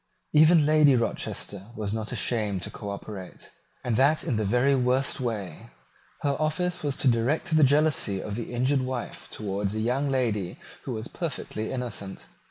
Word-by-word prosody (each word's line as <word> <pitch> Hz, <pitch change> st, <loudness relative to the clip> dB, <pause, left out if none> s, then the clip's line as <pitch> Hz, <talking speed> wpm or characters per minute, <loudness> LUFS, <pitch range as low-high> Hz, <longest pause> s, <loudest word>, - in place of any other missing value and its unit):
Even 155 Hz, +1 st, +6 dB
Lady 150 Hz, -2 st, +5 dB
Rochester 105 Hz, -4 st, -2 dB
was 105 Hz, -2 st, -2 dB
not 110 Hz, -1 st, -3 dB
ashamed 105 Hz, -6 st, 0 dB
to -, -, -5 dB
cooperate, 100 Hz, -2 st, -8 dB, 0.3 s
and 120 Hz, -3 st, 0 dB
that 145 Hz, +4 st, +4 dB
in 115 Hz, -, -1 dB
the 110 Hz, -, 0 dB
very 125 Hz, +7 st, +3 dB
worst 130 Hz, +1 st, +1 dB
way. 105 Hz, -10 st, -4 dB, 0.5 s
Her 140 Hz, -1 st, +1 dB
office 175 Hz, +4 st, 0 dB
was 145 Hz, -2 st, -1 dB
to -, -, 0 dB
direct 130 Hz, +8 st, +2 dB
the 155 Hz, -, +6 dB
jealousy 140 Hz, -8 st, +3 dB
of 105 Hz, -, -5 dB
the 115 Hz, +3 st, -5 dB
injured 130 Hz, +3 st, +1 dB
wife 130 Hz, -1 st, -5 dB
towards 100 Hz, -1 st, -3 dB
a -, -, -1 dB
young 125 Hz, +6 st, 0 dB
lady 110 Hz, -9 st, -1 dB, 0.3 s
who 130 Hz, -, -3 dB
was 110 Hz, 0 st, -5 dB
perfectly 130 Hz, -9 st, -4 dB
innocent. 115 Hz, -6 st, -5 dB
125 Hz, 165 wpm, -27 LUFS, 105-140 Hz, 0.5 s, Even